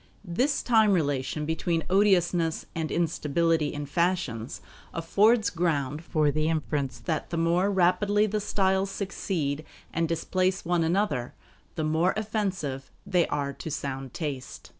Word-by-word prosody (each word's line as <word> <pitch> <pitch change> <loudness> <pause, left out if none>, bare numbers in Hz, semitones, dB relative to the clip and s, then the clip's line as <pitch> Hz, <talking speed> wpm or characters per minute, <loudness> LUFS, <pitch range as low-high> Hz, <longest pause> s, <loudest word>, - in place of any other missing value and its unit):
This 250 - 0
time 220 -4 +4
relation 145 -2 0
between 160 +1 -1
odiousness 180 -4 +2
and 160 -1 -3
instability 165 -1 +1
in 145 0 -4
fashions 145 - -1 0.4
affords 210 +7 +3
ground 155 -4 -1
for 155 -3 +2
the 155 +2 0
inference 145 -5 -1
that 155 +7 -3
the 170 - -3
more 170 +4 +2
rapidly 200 +3 +3
the 210 0 -1
styles 190 -1 +1
succeed 175 -7 -2 0.3
and 165 0 0
displace 185 +3 0
one 175 -1 +2
another, 160 -8 0 0.4
the 160 - -2
more 160 +4 +2
offensive 190 -11 -2 0.2
they 180 -2 +2
are 140 -1 -2
to 160 - -7
sound 135 -3 -4
taste. 140 -4 -5
165 Hz, 135 wpm, -27 LUFS, 150-190 Hz, 0.4 s, time